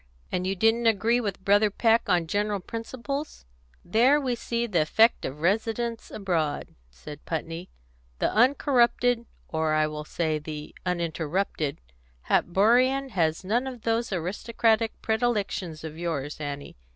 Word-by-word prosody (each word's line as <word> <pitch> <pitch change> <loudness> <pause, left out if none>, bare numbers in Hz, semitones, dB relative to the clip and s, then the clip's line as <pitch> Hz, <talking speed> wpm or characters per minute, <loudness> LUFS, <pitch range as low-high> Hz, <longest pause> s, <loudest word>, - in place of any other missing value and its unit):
"And 180 0 -1
you 195 - 0
didn't 225 +4 +3
agree 225 +3 +3
with 200 -4 -4
Brother 205 +1 +5
Peck 225 +3 +2
on 175 -2 +3
general 205 +4 -1
principles? 260 +8 -5 0.4
There 245 +10 +4
we 260 -4 -1
see 235 0 -2
the 185 -8 +1
effect 220 +9 +3
of 145 +3 -6
residence 225 +5 -1
abroad," 165 -7 -2 0.2
said 145 - -11
Putney. 165 +2 -4 0.5
"The - - 0
uncorrupted 245 -1 +3 0.2
or 160 -1 0
I 155 0 +3
will 150 0 -5
say 155 -1 -1
the 150 0 -7
uninterrupted 170 -2 -2 0.5
Hatborian 250 +9 +3
has 165 -6 0
none 235 +7 0
of 250 -4 -7
those 230 0 0
aristocratic 220 +5 0
predilections 210 -8 -1
of 160 0 -7
yours, 150 -4 -3
Annie. 145 - -6
200 Hz, 135 wpm, -26 LUFS, 160-235 Hz, 0.5 s, Brother